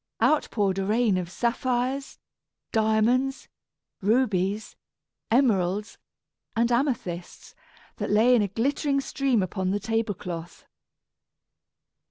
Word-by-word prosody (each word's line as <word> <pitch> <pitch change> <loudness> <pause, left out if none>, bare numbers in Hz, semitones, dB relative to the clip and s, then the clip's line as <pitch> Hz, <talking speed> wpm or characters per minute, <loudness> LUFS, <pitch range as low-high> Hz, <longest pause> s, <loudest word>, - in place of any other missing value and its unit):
out 310 - +3
poured 195 -3 0
a - - 0
rain 215 +1 +2
of 180 -2 -2
sapphires, 250 +5 -1 0.5
diamonds, 225 +5 +1 0.5
rubies, 205 -2 +1 0.5
emeralds, 210 -5 +1 0.6
and 235 +1 +2
amethysts, 235 - -2 0.4
that - - -3
lay 225 +4 +5
in 240 - +5
a 205 - +1
glittering 275 - 0
stream 270 -5 0
upon 185 0 -2
the 200 +2 0
table 225 -1 -1
cloth. 170 -1 -7
220 Hz, 105 wpm, -26 LUFS, 195-250 Hz, 0.6 s, lay